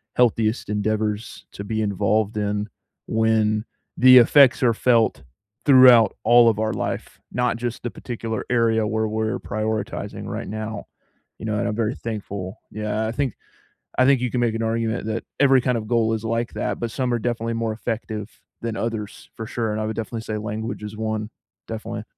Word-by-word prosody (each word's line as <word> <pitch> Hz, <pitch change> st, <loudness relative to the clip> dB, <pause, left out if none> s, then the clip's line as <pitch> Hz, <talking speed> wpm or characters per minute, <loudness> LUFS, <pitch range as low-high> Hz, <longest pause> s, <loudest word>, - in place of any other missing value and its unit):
healthiest 115 Hz, -2 st, +2 dB
endeavors 105 Hz, +1 st, -2 dB
to 100 Hz, -, -7 dB
be 110 Hz, +2 st, -2 dB
involved 105 Hz, +1 st, 0 dB
in, 105 Hz, 0 st, -1 dB, 0.4 s
when 110 Hz, -1 st, +1 dB, 0.3 s
the 130 Hz, 0 st, +8 dB
effects 130 Hz, +2 st, +6 dB
are 120 Hz, -2 st, +4 dB
felt 115 Hz, -, +2 dB, 0.4 s
throughout 125 Hz, -6 st, +7 dB
all 120 Hz, 0 st, +6 dB
of 110 Hz, -, -1 dB
our 110 Hz, 0 st, 0 dB
life, -, -, -4 dB
not 125 Hz, -1 st, 0 dB
just 120 Hz, 0 st, -4 dB
the 120 Hz, -, -2 dB
particular 115 Hz, -2 st, -5 dB
area 115 Hz, -2 st, +2 dB
where 110 Hz, 0 st, 0 dB
we're 110 Hz, +3 st, -1 dB
prioritizing 110 Hz, -1 st, -3 dB
right -, -, -5 dB
now, 110 Hz, 0 st, -5 dB, 0.5 s
you -, -, -7 dB
know, 105 Hz, -1 st, -1 dB
and -, -, 0 dB
I'm 105 Hz, -, -2 dB
very 115 Hz, +2 st, -1 dB
thankful. 100 Hz, -4 st, -6 dB
Yeah. 105 Hz, +1 st, -2 dB
I -, -, -2 dB
think 130 Hz, -1 st, -2 dB, 0.6 s
I 130 Hz, -, +5 dB
think 140 Hz, -2 st, +4 dB
you 125 Hz, -1 st, -1 dB
can 125 Hz, -, -1 dB
make 120 Hz, -2 st, +1 dB
an 115 Hz, -, -2 dB
argument 115 Hz, 0 st, -1 dB
that 110 Hz, +1 st, -3 dB
every 135 Hz, -2 st, +5 dB
kind 125 Hz, -1 st, 0 dB
of 110 Hz, -, -6 dB
goal 115 Hz, -1 st, +2 dB
is 110 Hz, 0 st, -4 dB
like 115 Hz, +1 st, -1 dB
that, -, -, -2 dB
but 120 Hz, -, -2 dB
some 125 Hz, +1 st, -1 dB
are -, -, +1 dB
definitely 115 Hz, 0 st, -2 dB
more 115 Hz, -1 st, -1 dB
effective 110 Hz, -1 st, -4 dB, 0.3 s
than 115 Hz, -1 st, -3 dB
others 110 Hz, -3 st, -5 dB
for 110 Hz, -, -5 dB
sure, 115 Hz, 0 st, -2 dB
and 105 Hz, -, -2 dB
I 110 Hz, -, -1 dB
would 110 Hz, -, -3 dB
definitely 115 Hz, 0 st, -4 dB
say 110 Hz, -1 st, -4 dB
language 110 Hz, +2 st, -4 dB
is 105 Hz, 0 st, -7 dB
one, 110 Hz, 0 st, -3 dB, 0.4 s
definitely. 110 Hz, 0 st, -5 dB
110 Hz, 185 wpm, -23 LUFS, 110-115 Hz, 0.6 s, the